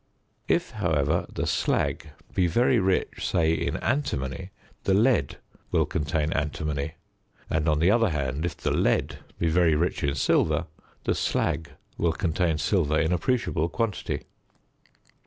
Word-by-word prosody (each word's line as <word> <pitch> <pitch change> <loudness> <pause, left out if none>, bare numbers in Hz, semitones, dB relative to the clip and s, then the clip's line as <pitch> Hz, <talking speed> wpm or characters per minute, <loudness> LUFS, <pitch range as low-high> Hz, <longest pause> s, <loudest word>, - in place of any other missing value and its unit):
If, - - +1
however, - - 0
the - - -2
slag - - 0 0.2
be 90 -2 +2
very 120 +7 +3
rich, 95 -1 0
say 80 -1 +2
in 80 +1 -1
antimony, 95 - -2 0.4
the 95 - +3
lead 110 - +2 0.3
will - - +2
contain 80 0 -1
antimony; 75 0 -2 0.6
and, 80 0 +1
on 75 - +3
the 85 +6 +4
other 115 -1 +3
hand, 70 -2 -2
if 85 - -3
the - - -1
lead - - +1 0.2
be 85 - 0
very 80 -1 +3
rich 85 +3 0
in 70 0 +1
silver, - - +2 0.4
the - - +1
slag 75 -3 -1 0.3
will 85 -1 +2
contain 80 0 0
silver 75 -1 +1
in 80 +2 +1
appreciable 90 - 0
quantity. 115 -3 -2
80 Hz, 140 wpm, -26 LUFS, 75-95 Hz, 0.6 s, the